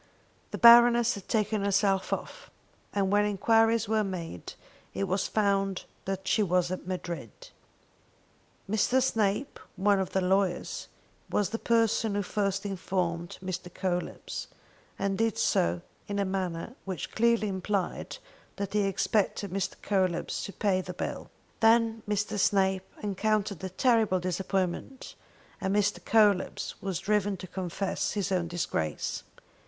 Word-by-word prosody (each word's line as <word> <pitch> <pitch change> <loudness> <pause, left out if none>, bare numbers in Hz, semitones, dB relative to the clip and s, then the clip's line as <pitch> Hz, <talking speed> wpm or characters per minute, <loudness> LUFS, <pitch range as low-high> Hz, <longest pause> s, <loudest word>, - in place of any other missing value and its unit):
The - - -5
Baroness 235 0 +7
had 200 - -9
taken 215 -2 0
herself 200 -1 +1
off, - - -5 0.4
and 195 -1 0
when 205 0 +4
enquiries 225 +2 +3
were 220 0 +2
made 170 - -6 0.4
it 100 - -1
was 190 - 0
found 195 -2 +1 0.2
that 190 0 -4
she 215 - +3
was 180 -2 +1
at 185 - -5
Madrid. 170 - -6 1.2
Mr. 220 +5 +2
Snape, 225 +2 0 0.2
one 200 +1 +3
of 190 - -1
the 190 - 0
lawyers, 190 -1 0 0.4
was 205 - 0
the 225 - -2
person 225 -2 +2
who 205 - 0
first 195 0 -1
informed 180 -3 -2
Mr. 180 -1 -4
Coelebs, 180 -2 -3 0.5
and 195 0 -1
did 225 -2 +1
so 85 +1 +1 0.3
in 205 - -3
a 200 - +1
manner 185 +1 -3
which 190 -4 -5
clearly 235 -1 +2
implied 190 -1 -2 0.4
that 200 -1 -4
he 210 - +3
expected 200 0 0
Mr. 195 0 -2
Coelebs 185 -4 0
to - - -6
pay 195 -2 +1
the 180 -1 -7
bill. - - -5 0.3
Then 225 0 +4
Mr. 210 0 -1
Snape 190 -1 +2
encountered 205 -1 -1
a 190 - -3
terrible 220 -1 +2
disappointment, 185 +6 -2 0.5
and 190 +1 0
Mr. 205 -1 +1
Coelebs 210 -4 +2
was 190 -3 -2
driven 205 +1 0
to 185 - -8
confess 185 +1 -3
his 200 -2 -2
own 180 -2 +1
disgrace. 115 - -2
195 Hz, 135 wpm, -29 LUFS, 185-210 Hz, 1.2 s, Baroness